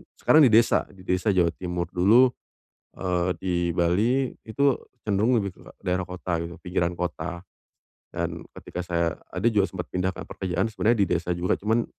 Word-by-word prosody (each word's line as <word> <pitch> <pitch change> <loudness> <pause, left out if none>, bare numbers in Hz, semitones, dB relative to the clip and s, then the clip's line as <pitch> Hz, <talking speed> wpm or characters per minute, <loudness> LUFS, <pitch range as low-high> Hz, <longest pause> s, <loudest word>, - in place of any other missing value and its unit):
sekarang 155 - +4
di - - +1
desa, 115 +1 +4
di 95 -2 -16
desa 95 +3 +1
Jawa 85 -2 +3
Timur, 90 -1 -4
dulu, 115 +8 +5 0.6
eee, 90 -1 -1
di 95 -1 -1 0.2
Bali, 110 +10 +2 0.2
itu 140 +4 +2 0.3
cenderung 110 +4 +2
lebih 100 -4 -1
ke - - -18 0.2
daerah 90 +1 0
kota 90 -2 -3
gitu, 85 +1 -6
pinggiran 90 -1 -1
kota. 85 0 -4 0.6
Dan, - - -4 0.2
ketika 90 - -6
saya 85 -2 0
ada 90 +3 -6
juga 100 -2 +2
sempat 90 -2 -5
pindah 90 0 0
ke - - -7
pekerjaan 95 -1 -2
sebenarnya 115 +2 +2
di - - -5
desa 85 0 0
juga. 90 +1 0
Cuman, 110 +3 +1
90 Hz, 170 wpm, -25 LUFS, 90-105 Hz, 0.6 s, dulu